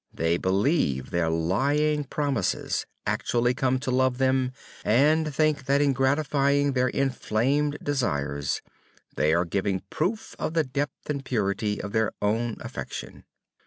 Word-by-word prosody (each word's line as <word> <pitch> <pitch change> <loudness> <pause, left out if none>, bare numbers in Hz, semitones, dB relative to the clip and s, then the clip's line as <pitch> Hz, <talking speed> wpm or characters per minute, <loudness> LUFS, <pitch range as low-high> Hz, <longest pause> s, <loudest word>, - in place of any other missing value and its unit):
They 80 +1 +1
believe 95 - +1
their 85 -1 +1
lying 140 - +1
promises, 135 -8 -1 0.2
actually 120 +1 +1
come 130 0 +1
to 130 - -2
love 130 0 +2
them, 130 -1 +2 0.3
and 150 +7 +3
think 150 -1 +1
that 140 +1 +3
in 145 -1 +3
gratifying 140 +1 +2
their 130 0 +2
inflamed 135 +2 0
desires, 70 - -1 0.5
they 75 - +2
are 85 +1 +2
giving 95 +3 0
a - - -11
proof 205 +8 -2
of 160 - -2
the 160 - +4
depth 140 +2 -4
and 140 -2 -2
purity 105 -3 -1
of 100 - -5
their 110 -1 +1
own 115 +3 0
affection. - - -7
130 Hz, 140 wpm, -26 LUFS, 105-145 Hz, 0.5 s, the